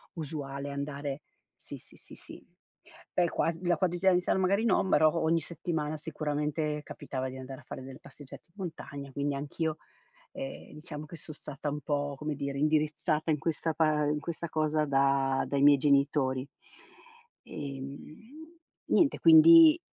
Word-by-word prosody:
usuale 145 Hz, -3 st, -5 dB
andare 140 Hz, 0 st, -5 dB, 0.3 s
sì, -, -, -10 dB
sì, -, -, -19 dB
sì, -, -, -14 dB
sì. -, -, -12 dB, 0.7 s
Beh, 175 Hz, -1 st, +2 dB
quas 165 Hz, 0 st, 0 dB
la 175 Hz, -1 st, +2 dB
quotidianità 180 Hz, 0 st, +2 dB
magari 195 Hz, +3 st, +2 dB
no, 220 Hz, -4 st, +3 dB
però 155 Hz, -2 st, +4 dB
ogni 165 Hz, +1 st, +3 dB
settimana 160 Hz, -2 st, -3 dB
sicuramente 150 Hz, 0 st, -2 dB
capitava 130 Hz, -3 st, -5 dB
di 130 Hz, -, -8 dB
andare 130 Hz, 0 st, -8 dB
a -, -, -21 dB
fare -, -, -8 dB
delle 135 Hz, +2 st, -10 dB
passeggiate 145 Hz, -3 st, -13 dB
in 170 Hz, -, -38 dB
montagna, 140 Hz, -7 st, -7 dB
quindi 140 Hz, +1 st, -2 dB
anch'io, 155 Hz, +3 st, -3 dB, 0.6 s
ehm, 270 Hz, -1 st, -8 dB
diciamo 150 Hz, -1 st, -8 dB
che 170 Hz, -, -10 dB
son 155 Hz, 0 st, -9 dB
stata 150 Hz, 0 st, -6 dB
un 145 Hz, +1 st, -4 dB
po', 145 Hz, -1 st, -2 dB
come 150 Hz, +1 st, -3 dB
dire, 140 Hz, 0 st, -4 dB
indirizzata 155 Hz, +1 st, +1 dB
in 150 Hz, -, +2 dB
questa 160 Hz, +2 st, -1 dB
pa 155 Hz, -1 st, +2 dB
in 150 Hz, 0 st, 0 dB
questa 170 Hz, +2 st, -5 dB
cosa 155 Hz, -1 st, 0 dB
da 135 Hz, -1 st, +2 dB
dai 140 Hz, -1 st, -1 dB
miei 145 Hz, 0 st, +7 dB
genitori, 140 Hz, -2 st, +2 dB, 1.0 s
ehm, 140 Hz, +2 st, -8 dB, 0.7 s
niente, 310 Hz, -5 st, +3 dB
quindi 330 Hz, 0 st, +8 dB
150 Hz, 150 wpm, -29 LUFS, 140-165 Hz, 1.0 s, quindi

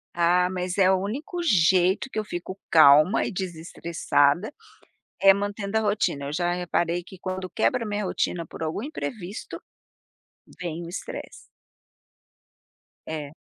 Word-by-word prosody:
Ah, 175 Hz, +1 st, +3 dB
mas 180 Hz, -1 st, -3 dB
é 190 Hz, -1 st, +5 dB
o 190 Hz, -, +3 dB
único 295 Hz, -, -4 dB
jeito 185 Hz, -, +3 dB
que 220 Hz, -, -3 dB
eu 215 Hz, -, -1 dB
fico 185 Hz, 0 st, -6 dB
calma 155 Hz, +5 st, +6 dB
e -, -, -3 dB
desestressada 170 Hz, -, 0 dB, 0.7 s
é 195 Hz, 0 st, +8 dB
mantendo 205 Hz, +1 st, -2 dB
a 220 Hz, -, +2 dB
rotina. 205 Hz, -9 st, 0 dB
Eu 140 Hz, -, -4 dB
já 175 Hz, +2 st, 0 dB
reparei 175 Hz, -1 st, -1 dB
que 185 Hz, +2 st, -13 dB
quando 185 Hz, 0 st, -5 dB
quebra 235 Hz, +7 st, 0 dB
a -, -, -5 dB
minha 210 Hz, 0 st, -2 dB
rotina 175 Hz, -2 st, -2 dB
por -, -, -11 dB
algum 160 Hz, +6 st, -3 dB
imprevisto 220 Hz, -, -6 dB, 1.0 s
vem 170 Hz, -1 st, -4 dB
o -, -, -8 dB
estresse. 175 Hz, -, -7 dB, 1.7 s
É. 150 Hz, -2 st, -5 dB
180 Hz, 145 wpm, -25 LUFS, 170-205 Hz, 1.7 s, é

